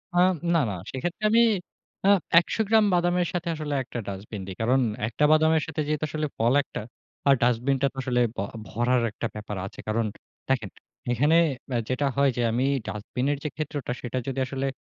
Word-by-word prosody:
আম 185 Hz, +1 st, +5 dB, 0.2 s
না, 165 Hz, -, +4 dB
না -, -, -2 dB, 0.2 s
সেক্ষেত্রে 175 Hz, +10 st, -4 dB
আমি 230 Hz, +2 st, +5 dB, 0.6 s
আ -, -, +6 dB, 0.3 s
১০০ 200 Hz, -, -2 dB
গ্রাম 220 Hz, -1 st, +5 dB
বাদামের 175 Hz, 0 st, +2 dB
সাথে 175 Hz, -1 st, -2 dB
আসলে 150 Hz, -1 st, -4 dB
১ 130 Hz, -, -8 dB
টা 120 Hz, -, -2 dB
ডাস্টবিন 100 Hz, +1 st, -6 dB
দেই। 95 Hz, -, -6 dB
কারণ 125 Hz, +4 st, +3 dB, 0.3 s
১ 115 Hz, -, -7 dB
টা 150 Hz, -, +6 dB
বাদামের 160 Hz, 0 st, +4 dB
সাথে 155 Hz, -1 st, -2 dB
যেহেতু 155 Hz, 0 st, 0 dB
আসলে 155 Hz, 0 st, -2 dB
ফল 115 Hz, +3 st, +3 dB
১ -, -, -14 dB
টা -, -, -2 dB, 0.5 s
আর 135 Hz, -, +7 dB
ডাস্টবিনটা 130 Hz, +3 st, +2 dB
তো -, -, -36 dB
আসলে 125 Hz, -1 st, +1 dB
ব -, -, -26 dB, 0.3 s
ভরার 120 Hz, +2 st, +1 dB
একটা 115 Hz, +1 st, -3 dB
ব্যাপার 105 Hz, -1 st, -5 dB
আছে। -, -, -10 dB
কারণ 110 Hz, +1 st, +1 dB, 0.4 s
দেখেন 115 Hz, -7 st, +1 dB, 0.4 s
এখানে 145 Hz, +7 st, +3 dB, 0.3 s
ব্যা 125 Hz, -, 0 dB
যেটা 130 Hz, +3 st, 0 dB
হয় 140 Hz, 0 st, +4 dB
যে, -, -, +1 dB
আমি 125 Hz, +3 st, +1 dB, 0.2 s
ডাস্টবিনের 125 Hz, +7 st, -2 dB
যে, -, -, -1 dB
ক্ষেত্রটা 145 Hz, -4 st, -4 dB
সেটা 125 Hz, +1 st, -4 dB
যদি 135 Hz, 0 st, -2 dB
আসলে 135 Hz, +1 st, -3 dB
135 Hz, 195 wpm, -26 LUFS, 120-155 Hz, 0.6 s, আর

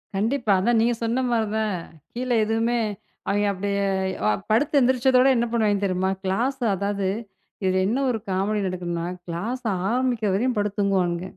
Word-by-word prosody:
கண்டிப்பா 225 Hz, +2 st, 0 dB
அதான் 235 Hz, +4 st, +2 dB
நீங்கச் 235 Hz, 0 st, +1 dB
சொன்ன 230 Hz, +3 st, 0 dB
மாதிரிதான். 220 Hz, -2 st, 0 dB, 0.4 s
கீழே 245 Hz, 0 st, -1 dB
எதுவுமே 225 Hz, +2 st, +1 dB, 0.5 s
அவங்க 205 Hz, +1 st, +1 dB
அப்டியே 200 Hz, +1 st, -1 dB, 0.6 s
படுத்து 285 Hz, +7 st, +2 dB
எழுந்திருச்சதோட 260 Hz, 0 st, +4 dB
என்ன 235 Hz, 0 st, +2 dB
பண்ணுவாங்க 205 Hz, -3 st, +1 dB
தெரியுமா? 190 Hz, 0 st, 0 dB
கிளாஸ் 240 Hz, +8 st, 0 dB, 0.2 s
அதாவது 200 Hz, 0 st, -1 dB, 0.6 s
இதுல 185 Hz, 0 st, +2 dB
என்ன 245 Hz, +6 st, 0 dB
ஒரு 225 Hz, -, -1 dB
காமடி 200 Hz, +3 st, 0 dB
நடக்குதுன்னா 175 Hz, -2 st, -3 dB, 0.2 s
கிளாஸ் 215 Hz, +10 st, -4 dB, 0.2 s
ஆரம்பிக்கிறவரையும் 240 Hz, -1 st, +1 dB
படுத்துத் 205 Hz, 0 st, -1 dB
தூங்குவாங்க. 180 Hz, -3 st, +1 dB
215 Hz, 130 wpm, -24 LUFS, 195-240 Hz, 0.6 s, எழுந்திருச்சதோட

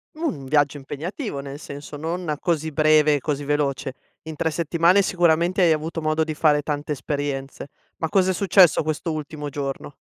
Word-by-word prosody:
Mhmm, 320 Hz, +2 st, -4 dB, 0.2 s
un -, -, -9 dB
viaggio 145 Hz, +1 st, +2 dB
impegnativo, 150 Hz, -, -5 dB
nel 140 Hz, 0 st, -7 dB
senso, 145 Hz, 0 st, -9 dB
non 160 Hz, +1 st, -3 dB
così 160 Hz, -2 st, -1 dB
breve 155 Hz, 0 st, +4 dB
e -, -, -1 dB
così 145 Hz, -1 st, -2 dB
veloce. 140 Hz, -2 st, -1 dB, 0.3 s
In 160 Hz, -1 st, -7 dB
3 160 Hz, +2 st, -1 dB
settimane 170 Hz, +4 st, +3 dB
sicuramente 175 Hz, 0 st, +2 dB
hai 170 Hz, -2 st, +5 dB
avuto 160 Hz, +1 st, -2 dB
modo 155 Hz, +1 st, +1 dB
di 155 Hz, -, -3 dB
fare 150 Hz, -1 st, +3 dB
tante 145 Hz, 0 st, -4 dB
esperienze. 140 Hz, -1 st, -4 dB, 0.3 s
Ma 160 Hz, -, -2 dB
cosa 190 Hz, +1 st, +3 dB
è -, -, -1 dB
successo 185 Hz, -3 st, +4 dB
questo 155 Hz, +2 st, -2 dB
ultimo 150 Hz, -1 st, -6 dB
giorno? 140 Hz, 0 st, -5 dB
155 Hz, 180 wpm, -23 LUFS, 145-170 Hz, 0.3 s, hai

